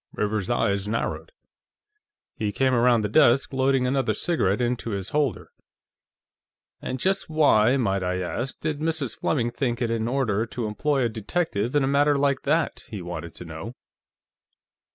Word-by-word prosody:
Rivers's 105 -2 -1
eyes 100 0 0
narrowed. 115 - -3 1.0
He 105 -1 -2
came 130 +4 +1
around 120 -1 +4
the - - +1
desk, 120 +6 +4
loading 135 -1 +2
another 135 +1 +1
cigarette 125 - 0
into 120 -1 -1
his 100 -3 -3
holder. 145 -4 -1 1.3
"And 130 - -4
just 195 +5 0
why, 135 -6 +4
might 100 -6 0
I 90 0 -1
ask, 120 +8 -4
did 155 -2 -2
Mrs. 155 -6 -2
Fleming 120 -6 0
think 120 -1 -2
it 120 -2 -1
in 115 -1 -1
order 115 -4 0
to 120 0 -4
employ 135 +6 0
a - - +3
detective 115 - -2
in 145 - +4
a - - +1
matter 145 +1 +3
like 140 -1 +1
that?" 160 +4 +1
he 105 -6 -6
wanted 85 -1 -6
to 90 - -9
know. 80 +9 -8
120 Hz, 160 wpm, -25 LUFS, 105-140 Hz, 1.3 s, around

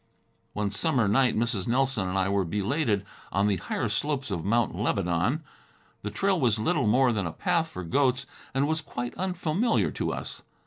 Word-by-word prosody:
One 105 -1 -1
summer 115 +2 +1
night, 120 +4 +3
Mrs. 115 -4 0
Nelson 125 -6 +1
and 95 - -1
I 95 -1 +2
were 100 0 +2
belated 105 - 0 0.3
on 100 +1 +2
the 100 -2 +2
higher 95 +6 -2
slopes 130 +3 -1
of 85 -4 -2
Mount 115 +3 +2
Lebanon. 100 - 0 0.6
The 105 - -3
trail 190 - +1
was 120 -6 +3
little 140 +2 +1
more 125 +3 +4
than 100 -5 -1
a - - -3
path 170 - 0
for 95 - -6
goats, 130 +7 +1 0.3
and 135 +1 +1
was 160 +1 0
quite 120 -5 -5
unfamiliar 185 +4 0
to - - -2
us. - - -5
120 Hz, 180 wpm, -27 LUFS, 100-145 Hz, 0.6 s, more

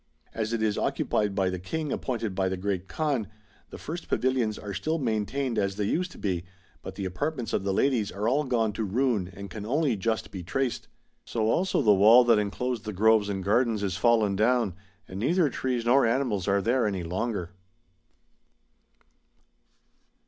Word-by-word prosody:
As 110 0 -2
it 115 -1 -1
is 105 -1 0
occupied 105 -2 0
by 95 -2 +1
the 90 - -4
King 150 - -4
appointed 115 -6 -2
by 95 0 0
the 95 - -3
Great 95 -1 -2
Kaan, 140 -8 -1 0.4
the - - -9
first 170 +3 -6
pavilions 125 -5 0
are 100 -1 -6
still 160 +10 -1
maintained 120 0 -1
as 100 -1 -1
they 105 - -2
used 175 - -1
to - - -14
be, 90 -4 -2 0.4
but - - -8
the 100 - -4
apartments 125 - -3
of 95 - 0
the 100 - 0
ladies 110 0 +1
are 105 +3 -2
all 140 +5 +2
gone 115 -4 0
to 110 - -3
ruin 110 -2 0
and 100 +1 -9
can 105 - -6
only 135 +3 +1
just 110 +3 -2
be 95 - -6
traced. 125 +8 -2 0.4
So 110 -1 0
also 185 -5 +1
the 105 -3 +6
wall 110 +6 +7
that 115 -3 +4
enclosed 110 +3 -2
the 105 - -4
groves 110 +1 +3
and 95 -2 -3
gardens 110 +1 +1
is 95 -3 -1
fallen 110 -1 +3
down, 115 -1 +2 0.3
and 95 - -7
neither 160 - +2
trees 125 -3 -2
nor 130 +3 +5
animals 115 -6 0
are 100 0 +2
there 120 +1 +2
any 95 -4 -2
longer." 90 +1 -3
110 Hz, 185 wpm, -27 LUFS, 100-125 Hz, 0.4 s, wall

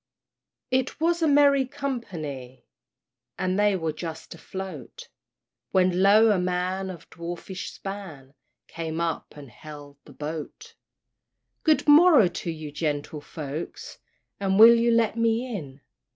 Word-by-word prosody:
It 260 +2 0
was 340 +1 +1
a 320 - +3
merry 280 -1 +5
company, 155 - -6 0.7
And 185 +1 -1
they 205 -1 +3
were 165 -3 -2
just 160 +1 -7
afloat, 170 -4 -9 0.6
When 185 -1 +3
lo! 215 +3 +6
a 200 - +2
man, 180 +1 -2
of 170 -3 -10
dwarfish 175 +2 -7
span, 175 -9 -9 0.3
Came 165 -1 -5
up 165 -2 -3
and 140 -4 -11
hailed 145 -1 -12
the 145 - -14
boat. 160 - -7 0.9
"Good 310 -1 +2
morrow 295 - +7
to 175 0 -5
ye, 155 -2 -6
gentle 150 0 -3
folks, 150 +1 -7 0.4
And 195 -1 0
will 225 +2 +10
you 235 0 +2
let 230 -1 +2
me 230 +1 +1
in? 140 -6 -8
185 Hz, 130 wpm, -25 LUFS, 155-230 Hz, 0.9 s, will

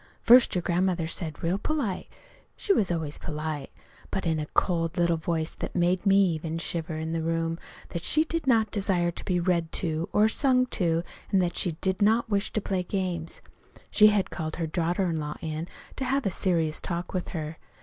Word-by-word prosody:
"First 245 -1 +7
your 180 - 0
grandmother 180 -1 +1
said 160 -2 -3
real 175 +4 +1
polite 270 -11 -2 0.5
she 400 - +1
was 205 - +2
always 160 -4 -2
polite 150 -2 -4 0.4
but 190 - -3
in 160 -2 +1
a 150 - -3
cold 165 -3 +1
little 170 -1 +3
voice 160 0 -1
that - - -6
made 180 +1 +2
even 170 -5 +2
me - - -1
shiver 165 -1 -3
in 160 +1 -3
the 165 - 0
other 160 - -2
room, 165 0 -1 0.3
that 170 - -4
she 310 - +3
did 325 -2 -3
not 220 -4 +3
desire 185 -4 +1
to - - -8
be 180 -2 0
read 170 -2 0
to 165 +1 -1
or 210 +1 +4
sung 255 +2 +3
to, 170 -8 0 0.3
and 195 - +4
that 175 - -2
she 175 - +1
did 190 +1 0
not 220 +2 +3
wish 200 0 0
to - - +1
play 190 -2 -1
games. 180 -3 -3 0.5
She 210 0 +7
had 210 -2 +2
called 155 -2 -4
her 165 - -2
daughter 175 +4 0
in 165 -2 -1
law 150 -1 -4
in 160 +1 -4 0.3
to 265 - -2
have 275 +1 0
a 195 - +1
serious 165 -4 0
talk 175 -1 -4
with 185 -2 -2
her. 160 -2 -5
175 Hz, 205 wpm, -27 LUFS, 165-195 Hz, 0.5 s, First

